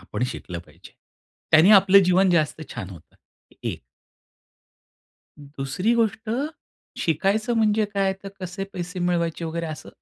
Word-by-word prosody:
आपण 105 +5 -6
शिकलं 90 -2 -7
पाहिजे. - - -17 0.6
त्यांनी 160 +5 +7
आपलं 195 -1 +7
जीवन 185 +1 +4
जास्त 160 -2 +1
छान 100 -6 -6
होतं, 85 -4 -15 0.5
एक. - - -4 1.6
दुसरी 145 - -2
गोष्ट, 225 -1 0 0.7
शिकायचं 200 - 0
म्हणजे 215 -1 +3
काय 195 -1 +2
तर 200 - -6
कसे 185 +1 -5
पैसे 180 0 -6
मिळवायचे 170 -2 -1
वगैरे 165 +1 -3
असं. 155 -1 -8
180 Hz, 125 wpm, -24 LUFS, 155-195 Hz, 1.6 s, त्यांनी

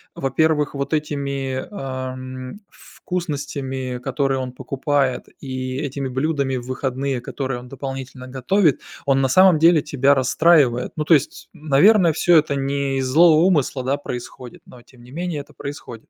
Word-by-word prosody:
во-первых 150 +2 +1
вот 140 +1 -3
этими, 140 -3 -3
ам, 130 -5 -6 0.2
вкусностями, 140 -7 -5
которые 135 +1 -1
он 130 -1 -4
покупает, 135 0 -1
и 130 -1 -4
этими 140 -1 -3
блюдами 135 0 -1
в 120 - -7
выходные, 130 0 -2
которые 130 0 -4
он 125 - -12
дополнительно 135 -1 -7
готовит, 140 +6 +1 0.2
он 135 -1 +2
на 135 - +2
самом 185 +3 +5
деле 165 -1 +5
тебя 140 -1 +2
расстраивает. 135 -1 +3
Ну 155 - -1
то 165 - +4
есть, 145 - 0
наверное 160 +5 +4
всё 175 +1 +4
это 145 -2 -2
не 140 0 -1
из 130 - -1
злого 155 +4 +5
умысла, 145 -7 +1
да, 135 +3 0
происходит, 125 -2 -8
но 125 - -15
тем 120 0 -20
не 125 - -15
менее, 170 -1 -4
это 140 - -17
происходит. 125 -5 -9
135 Hz, 155 wpm, -21 LUFS, 130-150 Hz, 0.2 s, самом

